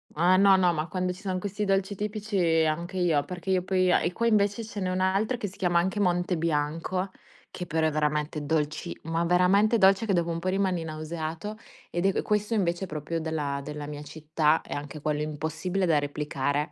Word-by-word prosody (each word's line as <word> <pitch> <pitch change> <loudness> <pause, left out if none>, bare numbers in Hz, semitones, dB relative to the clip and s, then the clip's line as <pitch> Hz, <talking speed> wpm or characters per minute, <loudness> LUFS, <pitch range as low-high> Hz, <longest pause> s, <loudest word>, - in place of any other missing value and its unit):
Eh, 180 +4 +4
no, 195 0 +6
no, 180 -2 +3
ma 155 +1 -2
quando 185 0 -2
ci 185 - -14
son 190 -3 -2
questi 205 +2 -3
dolci 195 +1 +1
tipici 200 -6 0
anche 170 +4 -2
io, 165 -5 +2
perché 180 +1 -4
io 185 -1 +3
poi 185 -1 +2
a - - +4
e - - 0
qua 230 +6 -2
invece 210 -1 +2
ce 215 - -7
n'è 185 -2 -1
un 185 0 -1
altro 200 +6 +1
che 205 - -3
si 190 - -11
chiama 175 -2 +1
anche 190 +4 +1
Monte 180 -1 +1
Bianco, 165 +4 -1 0.4
che 180 -1 -6
però 160 +1 +1
è 155 - +2
veramente 150 0 -1
dolci 150 +2 -2
ma 165 +1 -1
veramente 185 +6 +4
dolce, 195 +1 +4
che 200 - +2
dopo 170 -1 +1
un 165 - -2
po' 175 - -5
rimani 185 -3 +1
nauseato. 160 +5 -5 0.3
Ed 175 +2 +1
è - - +4
q - - -1
questo 210 +2 0
invece 180 -2 0
è - - -12
proprio 155 +1 -3
della 150 -3 -2
della 150 +1 -6
mia 145 0 -6
città 155 +1 0
e - - -7
anche 145 +1 -6
quello 150 0 -1
impossibile 160 +5 -2
da 155 -4 +3
replicare. 145 0 -2
175 Hz, 215 wpm, -27 LUFS, 155-190 Hz, 0.4 s, no